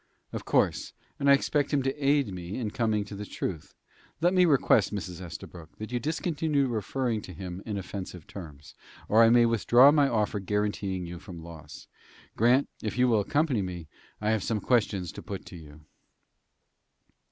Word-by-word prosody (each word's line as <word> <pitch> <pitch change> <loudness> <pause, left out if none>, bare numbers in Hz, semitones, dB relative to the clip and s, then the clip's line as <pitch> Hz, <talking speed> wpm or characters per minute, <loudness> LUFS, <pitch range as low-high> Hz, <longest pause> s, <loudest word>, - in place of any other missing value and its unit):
"Of - - -5
course; - - +1 0.3
and 140 0 +2
I - - +9
expect 145 +1 +1
him 140 -3 +1
to 135 0 0
aid 140 -7 +2
me 90 +1 -6
in 110 -5 -3
coming 110 -2 0
to 105 - -10
the 100 +1 -6
truth. 90 -5 -5 0.4
Let 175 +3 +3
me 180 -1 +5
request, 135 - +3
Mrs. 95 -4 -5
Estabrook, 85 -1 -10
that 110 +2 -7
you 120 - 0
discontinue 155 -1 0
referring 120 0 -1
to 90 - -10
him 90 +2 -7
in 105 -2 -3
offensive 95 -3 -7
terms, 75 -7 -11 0.3
or 110 +2 +5
I 115 - +7
may 120 0 +6
withdraw 120 +4 +6
my 145 -2 +3
offer 105 -3 0
guaranteeing 100 -2 -2
you 85 0 -7
from 85 -4 -10
loss. 80 -3 -11 0.5
Grant, 125 +5 +4
if 110 +2 -4
you 125 0 +4
will 115 -3 +3
accompany 140 +2 +1
me, 90 -4 -6 0.3
I 105 +1 0
have 110 -2 +1
some 110 +2 -1
questions 105 -7 0
to - - -9
put - - -7
to - - -11
you." 75 -2 -13
105 Hz, 180 wpm, -28 LUFS, 90-130 Hz, 0.5 s, I